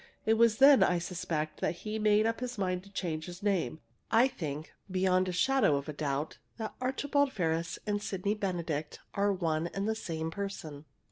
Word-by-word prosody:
It 220 - +4
was 225 -1 +4
then, 275 0 +8
I 180 - +4
suspect, 165 -3 -3
that - - 0
he 215 +1 -2
made 215 0 +4
up 225 0 0
his 250 -1 -4
mind 185 -2 -1
to - - -14
change 160 -5 -3
his 180 +2 -9
name. 190 -6 0 0.3
I 235 +4 +5
think, 155 - -6 0.2
beyond 185 0 +2
a - - -1
shadow 250 - +3
of 140 0 -3
a 150 - -4
doubt, 145 0 -2 0.2
that 220 -2 -4
Archibald 285 +2 +1
Ferris 165 -4 -1
and 205 -1 -1
Sydney 200 0 -1
Benedict 170 -7 -3
are 200 0 +2
one 165 -3 0
and 195 +3 -3
the 220 - +2
same 165 -7 -4
person!" 165 -7 -6
185 Hz, 190 wpm, -31 LUFS, 160-215 Hz, 0.3 s, then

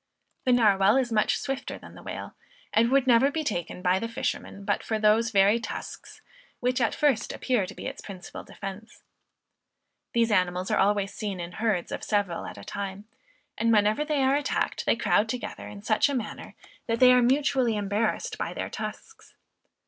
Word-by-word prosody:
The 255 - +3
Narwal 205 -4 +4
is 245 -3 -1
much 215 -1 +2
swifter 270 -1 -4
than - - -13
the - - -12
whale, - - -7 0.4
and 230 +2 +4
would 270 0 +3
never 250 +2 +5
be 315 +2 -2
taken 180 - -3
by 185 +1 +3
the 230 - -3
fishermen 200 -3 -4
but - - 0
for 220 - -2
those 215 +2 +3
very 205 +1 +4
tusks, - - -8 0.4
which 250 +1 0
at 230 - +1
first 280 -7 +1
appear 240 -8 0
to - - -10
be - - -8
its - - -5
principal 185 -3 -9
defence. 195 +3 -9 1.1
These 230 -1 +2
animals 180 -2 +1
are - - +2
always 200 0 +2
seen 200 -3 -4
in 170 0 -5
herds 210 -4 -1
of - - -4
several 200 -5 -1
at - - -9
a - - -10
time; 200 0 -6 0.5
and 230 0 +2
whenever 215 +5 +3
they 300 -3 0
are 265 +1 +3
attacked 290 0 -1
they - - +4
crowd 220 -2 +2
together 245 0 -5
in 200 -1 -10
such 220 +6 +3
a 280 - -1
manner, 230 -4 -5 0.3
that 230 0 0
they 250 -1 +8
are 250 - +5
mutually 260 -2 +2
embarrassed 205 +2 -1
by - - -3
their - - -4
tusks. 450 - -8
220 Hz, 185 wpm, -27 LUFS, 200-250 Hz, 1.1 s, they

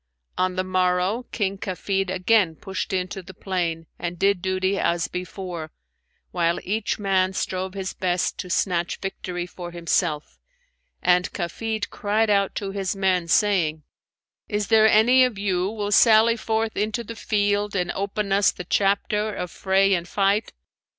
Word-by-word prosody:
On 185 0 0
the 185 - 0
morrow 185 +5 0
King 195 -3 -2
Kafid 195 0 -2
again 185 -1 +2
pushed 190 +1 -5
into 185 0 -2
the 185 0 -13
plain 170 -4 -2
and 175 0 -4
did 195 0 +2
duty 190 +1 0
as 170 0 +1
before, 180 -3 -6 0.6
while 170 -1 +1
each 205 +2 -1
man 190 -2 +1
strove 185 +1 -3
his 190 -1 -4
best 180 -1 -1
to 180 - -5
snatch 175 -1 0
victory 180 -2 -5
for 175 -1 -8
himself; 170 -2 -1 0.6
and 180 0 +3
Kafid 210 +4 -3
cried 215 +1 +1
out 200 -1 +2
to 195 -2 -3
his 195 -1 -2
men, 185 -3 +1
saying, 165 -6 +2 0.7
'Is 210 -1 -2
there 220 -1 +6
any 240 +5 +6
of 250 -5 0
you 190 -2 0
will 205 -1 -3
sally 225 +1 +6
forth 220 -1 -1
into 215 +3 -1
the 230 +1 -8
field 205 -1 0
and 180 -2 0
open 200 +1 -3
us 200 0 +4
the 180 - -8
chapter 205 +3 +1
of 180 -4 -5
fray 195 +1 +2
and 175 -1 -1
fight?' 200 +3 +1
190 Hz, 155 wpm, -24 LUFS, 180-205 Hz, 0.7 s, there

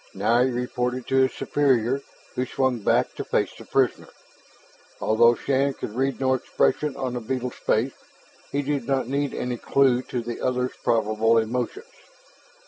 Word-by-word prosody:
Now 115 +5 +3
he 130 - +3
reported 125 0 -2
to 135 - +2
his 130 0 +4
superior, 135 -2 +1 0.3
who 125 +1 -2
swung 130 -3 0
back 100 - +1
to - - -5
face - - 0
the - - -12
prisoner. - - +1 0.9
Although 115 +2 +4
Shann 135 +1 0
could 105 - -6
read 135 +1 0
no 130 -1 +2
expression 140 +2 0
on 130 -2 -2
the 125 - -2
beetle's 125 +1 -3
face, 120 +5 0 0.6
he 145 +1 0
did 140 -3 -2
not 135 -3 0
need 140 +1 -1
any 125 -1 -2
clue 130 0 +3
to 125 -2 -4
the 120 0 -5
other's 125 0 0
probable 110 0 +2
emotions. 125 - -1
125 Hz, 160 wpm, -24 LUFS, 120-135 Hz, 0.9 s, his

